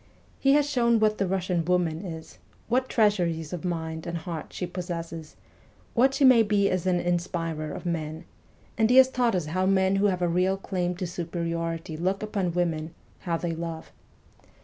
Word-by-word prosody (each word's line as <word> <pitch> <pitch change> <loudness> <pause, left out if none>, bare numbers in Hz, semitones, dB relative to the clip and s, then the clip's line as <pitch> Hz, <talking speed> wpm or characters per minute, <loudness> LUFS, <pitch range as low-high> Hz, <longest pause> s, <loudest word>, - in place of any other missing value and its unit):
He 275 0 +4
has 290 0 +3
shown 235 -5 +2
what 215 0 +2
the 195 - +1
Russian 180 -2 0
woman 175 -1 0
is, 160 -4 -8 0.3
what 255 +3 +1
treasuries 175 -7 +1
of 175 - -5
mind 160 -2 -3
and 170 0 -3
heart 165 -1 -6
she 180 - -4
possesses, 170 -3 -6 0.6
what 265 +3 +3
she 280 - +4
may 255 -3 +7
be 205 -2 +2
as 185 0 -1
an 180 -1 +2
inspirer 170 -3 -2
of - - -7
men; 160 -2 -3 0.5
and 220 0 +4
he 250 - +4
has 260 0 +8
taught 245 -5 +1
us 175 -4 -1
how 185 +5 0
men 190 0 +3
who 205 +1 +3
have 180 -2 0
a - - +3
real 180 +3 +1
claim 180 -2 -2
to 185 +1 -4
superiority 165 -1 -3
look 185 +5 -1
upon 195 -5 -1
women, 165 -2 -1 0.2
how 170 -2 -2
they 170 0 -3
love. 165 -1 -6
180 Hz, 185 wpm, -26 LUFS, 165-200 Hz, 0.6 s, has